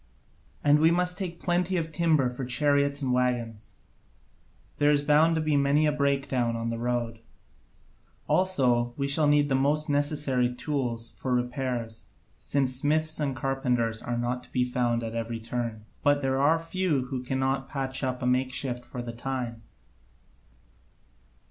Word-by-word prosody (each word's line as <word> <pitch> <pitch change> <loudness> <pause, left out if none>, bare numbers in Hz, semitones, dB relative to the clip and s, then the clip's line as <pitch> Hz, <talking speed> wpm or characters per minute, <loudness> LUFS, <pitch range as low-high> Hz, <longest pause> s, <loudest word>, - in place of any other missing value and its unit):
And 145 +1 +5
we 160 +1 +5
must 180 +1 +1
take 175 -3 -4
plenty 180 +1 0
of 160 -1 -2
timber 160 -5 +2
for 125 +2 -6
chariots 140 +2 +1
and 130 -2 +1
waggons; 120 -3 -1 1.0
there 145 - +4
is 145 -1 +3
bound 155 +3 +4
to 160 - 0
be 155 -1 +1
many 140 +2 +3
a 150 - +3
breakdown 135 -4 0
on 115 0 -2
the 115 - -4
road. 120 -1 -2 1.1
Also 125 -10 +2
we 140 -1 -1
shall 145 +2 +2
need 145 0 +4
the 135 - 0
most 145 +3 +2
necessary 145 -4 +1
tools 125 -5 -3
for 130 -1 -1
repairs, 125 -2 -3 0.3
since 130 -2 -1
smiths 155 +3 +1
and 140 -3 -1
carpenters 120 -3 -1
are 120 -1 -3
not 120 +1 -2
to - - -20
be 125 - +1
found 120 -1 0
at 115 0 -4
every 115 0 -3
turn, 115 -1 -4 0.2
but 145 0 +2
there 135 0 +1
are 155 +4 +4
few 165 -4 -1
who 130 -2 -3
cannot 135 +1 -1
patch 135 -1 -3
up 130 -1 -2
a - - 0
makeshift 130 0 -1
for 125 0 -7
the 120 -1 -6
time. 120 -2 -4
135 Hz, 160 wpm, -27 LUFS, 120-145 Hz, 1.1 s, And